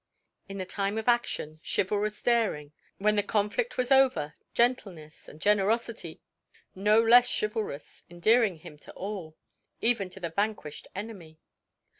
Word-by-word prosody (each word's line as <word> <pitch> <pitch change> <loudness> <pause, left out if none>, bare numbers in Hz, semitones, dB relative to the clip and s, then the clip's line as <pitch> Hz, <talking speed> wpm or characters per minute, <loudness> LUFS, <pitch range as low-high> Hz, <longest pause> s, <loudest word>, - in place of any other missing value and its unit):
In 195 - -6
the 185 - -3
time 200 +2 -2
of 220 - -4
action, 200 -10 0
chivalrous 210 +2 -1
daring; 220 -12 +1 0.3
when 210 +1 +2
the - - +4
conflict 210 - -1
was 255 +1 0
over, 260 - +4 0.2
gentleness 195 -11 -1
and 150 - -14
generosity 210 -2 0 0.5
no 210 +3 +3
less 240 +2 +6
chivalrous, 210 -8 -3
endearing 210 +4 +3
him 155 -1 -13
to - - -13
all 185 -6 -6 0.4
even 225 -5 +1
to 190 - -12
the 170 -3 -4
vanquished 200 -5 -3
enemy. 190 -6 -8
205 Hz, 135 wpm, -28 LUFS, 175-225 Hz, 0.5 s, less